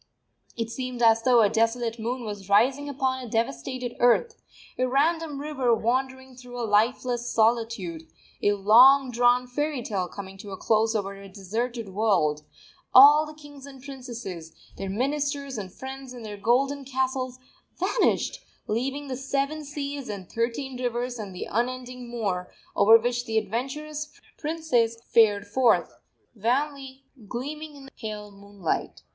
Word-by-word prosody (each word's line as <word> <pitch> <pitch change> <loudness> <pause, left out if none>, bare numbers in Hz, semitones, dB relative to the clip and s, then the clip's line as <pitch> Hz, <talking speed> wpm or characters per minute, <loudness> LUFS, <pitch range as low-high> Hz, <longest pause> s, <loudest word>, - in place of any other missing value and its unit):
It 230 -1 -3
seemed 250 -1 -4
as 225 0 +5
though 245 0 +5
a 210 - +6
desolate 230 +1 0
moon 240 +2 -3
was 205 -2 -7
rising 260 +8 +3
upon 260 -1 -1
a 245 - -8
devastated 235 - -2
earth; 435 - +3 0.4
a 255 - +2
random 300 +2 +1
river 270 -5 +1
wandering 260 +3 -2
through 245 -1 -9
a 235 - -1
lifeless 240 +3 +1
solitude; 220 -8 0 0.3
a 205 - +3
long 250 +7 +6
drawn 245 +1 +3
fairy 290 +1 -2
tale 190 -5 -2
coming 195 0 -9
to 205 - -9
a 190 - -6
close 220 +2 +2
over 200 -2 -1
a 195 - -11
deserted 220 +4 -4
world, 185 -7 +1 0.5
all 295 +4 +9
the 305 - -10
kings 290 -2 -12
and 270 -1 -12
the 255 - -16
princesses, 235 - -8 0.2
their 195 - -5
ministers 280 +4 -1
and 190 -2 -7
friends 265 +3 -8
and 240 -3 -9
their 210 -1 -6
golden 270 +7 +1
castles 260 -1 -2 0.4
vanished, 385 +6 0 0.2
leaving 265 +6 -2
the 260 - -3
Seven 275 +3 -2
Seas 285 -2 -5
and 195 -4 -6
Thirteen 250 +3 -3
Rivers 245 0 -2
and 200 -3 -7
the - - -4
Unending 250 +1 -3
Moor, 200 -7 -3 0.2
over 220 +3 +8
which 240 +1 -2
the 220 -1 -1
adventurous 290 +8 -3 0.2
princes 295 -8 0
fared 205 -3 +4
forth, 235 +3 +2 0.4
wanly 270 +4 -2 0.2
gleaming 295 +7 -6
in 275 -1 -12
the 270 - -14
pale 210 -2 -6
moonlight. 200 -3 -4
245 Hz, 150 wpm, -26 LUFS, 220-270 Hz, 0.5 s, all